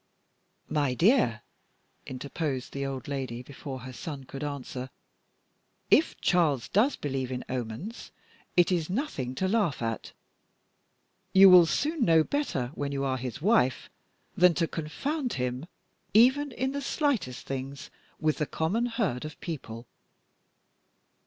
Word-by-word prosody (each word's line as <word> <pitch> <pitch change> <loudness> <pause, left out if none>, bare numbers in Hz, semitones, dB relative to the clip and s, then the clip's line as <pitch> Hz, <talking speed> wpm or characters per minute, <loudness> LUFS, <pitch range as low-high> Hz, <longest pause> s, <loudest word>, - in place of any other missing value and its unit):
"My 145 -4 0
dear," 170 - +3 0.6
interposed 135 0 -4
the 140 0 -2
old 135 -2 -5
lady, 130 -4 -4
before 135 0 -8
her 130 +1 -8
son 140 +2 -6
could 135 +2 -7
answer, 135 -2 -5 1.0
"if 320 - +4
Charles 155 -9 +2
does 240 +8 +3
believe 135 -3 -3
in 125 -1 -4
omens, 130 - -5 0.5
it 175 +1 +5
is 170 -3 0
nothing 180 - -3
to 185 +8 0
laugh 200 - +1
at. 115 -1 -3 1.2
You 190 0 +9
will 175 -2 +9
soon 300 - 0
know 165 -4 +5
better, 150 - -2
when 145 -2 -3
you 140 -1 -2
are 130 -1 0
his 125 +2 -6
wife, 175 - +2 0.4
than 180 -1 +5
to 165 0 +1
confound 250 - -3
him, 125 +4 -3 0.5
even 265 +6 +5
in 260 +1 -2
the 280 +1 -3
slightest 265 - -1
things, 135 +1 -6 0.3
with 155 -1 0
the 150 - 0
common 205 +10 0
herd 220 - -1
of 155 -1 -8
people. 120 -8 -6
150 Hz, 135 wpm, -28 LUFS, 130-195 Hz, 1.2 s, You